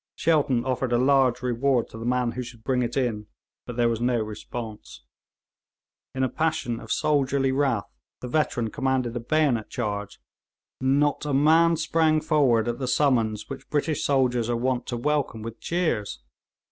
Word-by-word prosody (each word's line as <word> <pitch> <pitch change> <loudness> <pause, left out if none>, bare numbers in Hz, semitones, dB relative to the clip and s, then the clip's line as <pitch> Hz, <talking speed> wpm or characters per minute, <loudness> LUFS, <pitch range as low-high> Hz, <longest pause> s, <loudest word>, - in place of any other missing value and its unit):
Shelton 140 -7 +1
offered 130 -1 -1
a - - +4
large 130 -1 +3
reward 125 0 +1
to - - -10
the 115 - -4
man 125 -1 +1
who 125 +2 -5
should 115 -2 -10
bring 130 0 +1
it 120 +1 -2
in, 110 -5 -1 0.4
but 120 - -6
there 120 0 +2
was 115 -1 -1
no 120 -1 +1
response. 110 - -7 1.1
In 130 - 0
a - - +3
passion 155 -6 -1
of 110 - -9
soldierly 140 -2 +1
wrath, 130 -6 +1 0.3
the 125 - -6
veteran 120 -5 0
commanded 130 -3 -1
a - - -1
bayonet 125 -3 +1
charge; 105 -4 -4 0.6
not 140 +2 +1
a 145 -2 -1
man 165 +4 +4
sprang 160 -1 +2
forward 140 -8 +2
at 120 0 -2
the 130 - -2
summons 115 -7 +1
which 135 - -9
British 150 +1 -1
soldiers 125 -4 +1
are 120 - 0
wont 125 0 -1
to 120 - -3
welcome 140 -4 -1
with 115 0 -7
cheers. 155 - -2
125 Hz, 170 wpm, -25 LUFS, 115-140 Hz, 1.1 s, a